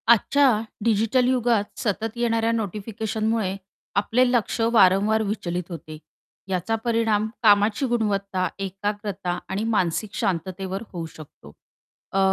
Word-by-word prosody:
आजच्या 240 Hz, 0 st, +4 dB, 0.2 s
डिजिटल 230 Hz, +3 st, +2 dB
युगात 240 Hz, -4 st, +2 dB, 0.2 s
सतत 220 Hz, +2 st, -2 dB
येणाऱ्या 230 Hz, -1 st, +1 dB
नोटिफिकेशनमुळे 220 Hz, -1 st, -2 dB, 0.4 s
आपले 245 Hz, +5 st, +3 dB
लक्ष 240 Hz, -1 st, 0 dB
वारंवार 205 Hz, +1 st, +5 dB
विचलित 180 Hz, -4 st, -2 dB
होते, 155 Hz, -2 st, -8 dB, 0.5 s
याचा 190 Hz, +4 st, 0 dB
परिणाम 225 Hz, -2 st, +2 dB, 0.2 s
कामाची 210 Hz, +3 st, +4 dB
गुणवत्ता, 200 Hz, -5 st, 0 dB
एकाग्रता, 195 Hz, -1 st, -3 dB
आणि 200 Hz, +3 st, -2 dB
मानसिक 210 Hz, -2 st, 0 dB
शांततेवर 190 Hz, +2 st, -2 dB
होऊ 170 Hz, -2 st, -4 dB
शकतो 140 Hz, -, -13 dB, 0.6 s
अ, 195 Hz, -, +2 dB
210 Hz, 105 wpm, -24 LUFS, 190-225 Hz, 0.6 s, वारंवार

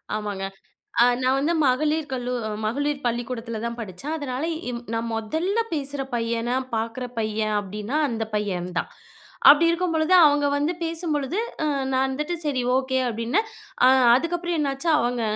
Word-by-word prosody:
ஆமாங்க. 205 Hz, -2 st, -4 dB, 0.8 s
நான் 260 Hz, +1 st, +3 dB
வந்து 295 Hz, +5 st, +1 dB
மகளிர் 300 Hz, +4 st, +1 dB
கல்லு 250 Hz, -1 st, -2 dB, 0.3 s
மகளிர் 285 Hz, +5 st, -1 dB
பள்ளிக்கூடத்துல 235 Hz, -1 st, -3 dB
தான் 235 Hz, 0 st, -4 dB
படிச்சேன். 225 Hz, -, -5 dB
அதனால 270 Hz, -1 st, -3 dB, 0.3 s
எம் 235 Hz, -1 st, -4 dB
நான் 230 Hz, 0 st, -2 dB
மொதல்ல 320 Hz, -, -1 dB, 0.2 s
பேசுற 280 Hz, -2 st, -3 dB
பையனா, 230 Hz, +1 st, -1 dB, 0.2 s
பாக்குற 230 Hz, +3 st, -3 dB
பையன் 215 Hz, -1 st, -1 dB
அப்டின்னா 210 Hz, +6 st, -4 dB
அந்த 225 Hz, -2 st, -2 dB
பையன்தான். 180 Hz, -4 st, -2 dB, 0.6 s
அப்டி 305 Hz, +3 st, +6 dB
இருக்கும்பொழுது, 335 Hz, -1 st, 0 dB
அவங்க 290 Hz, 0 st, +3 dB
வந்து 295 Hz, +4 st, +1 dB
பேசும்பொழுது 325 Hz, -1 st, -2 dB, 0.3 s
ம் 280 Hz, -3 st, 0 dB
நான் 260 Hz, +1 st, +2 dB
வந்துட்டு 300 Hz, +6 st, -2 dB
சரி, 265 Hz, -4 st, 0 dB
ஓகே 260 Hz, 0 st, 0 dB
அப்டின்னே, 230 Hz, -, 0 dB, 0.4 s
அ -, -, +8 dB, 0.3 s
அதுக்கப்புறம் 340 Hz, +3 st, -1 dB
என்னாச்சு? 275 Hz, +3 st, -2 dB
அவங்க 240 Hz, 0 st, 0 dB
260 Hz, 135 wpm, -24 LUFS, 230-300 Hz, 0.8 s, அ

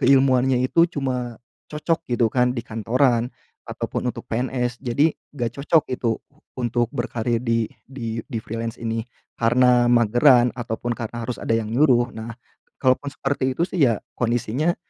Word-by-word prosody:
keilmuannya 130 Hz, -1 st, +4 dB
itu 165 Hz, +6 st, +4 dB
cuma 125 Hz, -5 st, -3 dB, 0.3 s
cocok 155 Hz, +2 st, -1 dB
gitu 120 Hz, -1 st, +3 dB
kan 125 Hz, 0 st, +2 dB
di 120 Hz, -, -2 dB
kantoran 120 Hz, +2 st, +1 dB, 0.4 s
ataupun 125 Hz, -, -2 dB
untuk -, -, -7 dB
PNS. 125 Hz, +1 st, -1 dB
Jadi 140 Hz, +5 st, +2 dB, 0.3 s
enggak 120 Hz, 0 st, -3 dB
cocok 160 Hz, +1 st, +3 dB
itu 115 Hz, -2 st, 0 dB, 0.4 s
untuk 120 Hz, -1 st, +1 dB
berkarir 120 Hz, -2 st, -1 dB
di 115 Hz, -1 st, +1 dB, 0.2 s
di 115 Hz, -4 st, -5 dB
di 115 Hz, -, -4 dB
freelance 115 Hz, +1 st, -5 dB
ini, 115 Hz, -1 st, -2 dB, 0.4 s
karena 120 Hz, +1 st, +4 dB
mageran 120 Hz, +2 st, +5 dB
ataupun 120 Hz, 0 st, -3 dB
karena 120 Hz, 0 st, -5 dB
harus 125 Hz, -, -3 dB
ada -, -, -1 dB
yang 110 Hz, -1 st, -1 dB
nyuruh. 125 Hz, -3 st, +4 dB
Nah 110 Hz, +1 st, -6 dB, 0.5 s
kalaupun 130 Hz, +2 st, +2 dB
seperti 135 Hz, -1 st, -1 dB
itu 170 Hz, -, 0 dB
sih 180 Hz, -, 0 dB
ya 115 Hz, -3 st, +1 dB, 0.2 s
kondisi 120 Hz, -2 st, -1 dB
nya 165 Hz, +4 st, +2 dB
120 Hz, 155 wpm, -23 LUFS, 115-130 Hz, 0.5 s, mageran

